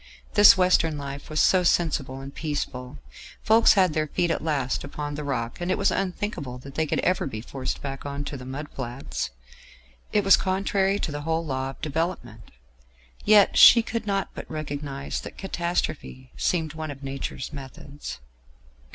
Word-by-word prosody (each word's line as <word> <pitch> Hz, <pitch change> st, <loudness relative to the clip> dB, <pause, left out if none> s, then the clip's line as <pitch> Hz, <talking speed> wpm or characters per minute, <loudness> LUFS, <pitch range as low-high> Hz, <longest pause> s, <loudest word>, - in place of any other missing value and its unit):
This 205 Hz, -1 st, +8 dB
Western 175 Hz, -4 st, +3 dB
life 140 Hz, 0 st, -7 dB
was 155 Hz, 0 st, -1 dB
so 185 Hz, -, +5 dB
sensible 150 Hz, -6 st, +1 dB
and 135 Hz, +1 st, -9 dB
peaceful; 135 Hz, -, -4 dB, 0.5 s
folks 225 Hz, +1 st, +6 dB
had 185 Hz, -5 st, +3 dB
their 155 Hz, 0 st, 0 dB
feet 170 Hz, +3 st, 0 dB
at 165 Hz, -, -2 dB
last 140 Hz, -5 st, -1 dB
upon 145 Hz, +1 st, -5 dB
the 150 Hz, +1 st, -5 dB
rock, 125 Hz, 0 st, -3 dB
and 175 Hz, -, -2 dB
it 185 Hz, -, +1 dB
was 200 Hz, -, +2 dB
unthinkable 180 Hz, -, -3 dB
that 135 Hz, +2 st, -11 dB
they 160 Hz, +1 st, 0 dB
could -, -, 0 dB
ever 185 Hz, -4 st, +1 dB
be 110 Hz, -5 st, -5 dB
forced 130 Hz, +3 st, -5 dB
back 135 Hz, -1 st, -5 dB
on 140 Hz, 0 st, -4 dB
to 145 Hz, -, -6 dB
the 130 Hz, -, -8 dB
mud 135 Hz, +4 st, -6 dB
flats: 125 Hz, -, -5 dB, 0.8 s
it 210 Hz, -, +2 dB
was 195 Hz, 0 st, +7 dB
contrary 195 Hz, +1 st, +1 dB
to 175 Hz, -, -3 dB
the 145 Hz, 0 st, -4 dB
whole 165 Hz, +2 st, -1 dB
law 130 Hz, -2 st, -2 dB
of 135 Hz, -, -11 dB
development. 150 Hz, -7 st, -3 dB, 0.8 s
Yet 210 Hz, -2 st, +6 dB
she 235 Hz, -1 st, +9 dB
could 230 Hz, -1 st, -4 dB
not 195 Hz, -1 st, 0 dB
but -, -, -8 dB
recognise 145 Hz, -2 st, -4 dB
that -, -, -10 dB
catastrophe 170 Hz, -8 st, -3 dB
seemed 160 Hz, -4 st, 0 dB
one 155 Hz, -1 st, -5 dB
of 140 Hz, -1 st, -8 dB
nature's 135 Hz, 0 st, -5 dB
methods.... 140 Hz, -, -8 dB
150 Hz, 175 wpm, -25 LUFS, 135-180 Hz, 0.8 s, she